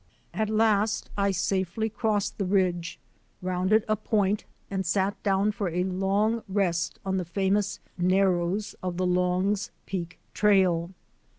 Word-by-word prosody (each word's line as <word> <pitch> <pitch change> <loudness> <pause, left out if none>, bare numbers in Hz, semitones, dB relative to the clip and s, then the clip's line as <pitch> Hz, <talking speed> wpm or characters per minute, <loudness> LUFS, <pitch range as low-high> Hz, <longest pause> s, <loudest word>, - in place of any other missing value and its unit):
At 220 -1 -1
last 215 -1 +2
I 200 0 +2
safely 190 +2 0
crossed 215 -2 -1
the 200 - 0
ridge, 180 -3 0 0.4
rounded 185 +4 +1
a 215 - +2
point, 210 -1 0 0.2
and 195 -1 -2
sat 195 +3 0
down 200 +1 +2
for 200 -3 -2
a 180 +2 0
long 195 +5 +1
rest 185 -4 0
on 190 0 0
the 185 - -1
famous 195 +3 0 0.2
Narrows 185 +1 +1
of 180 -1 -3
the 185 - 0
Long's 180 +3 +1 0.2
Peak 170 -3 -5 0.2
trail. 185 -5 +3
195 Hz, 135 wpm, -27 LUFS, 180-205 Hz, 0.4 s, trail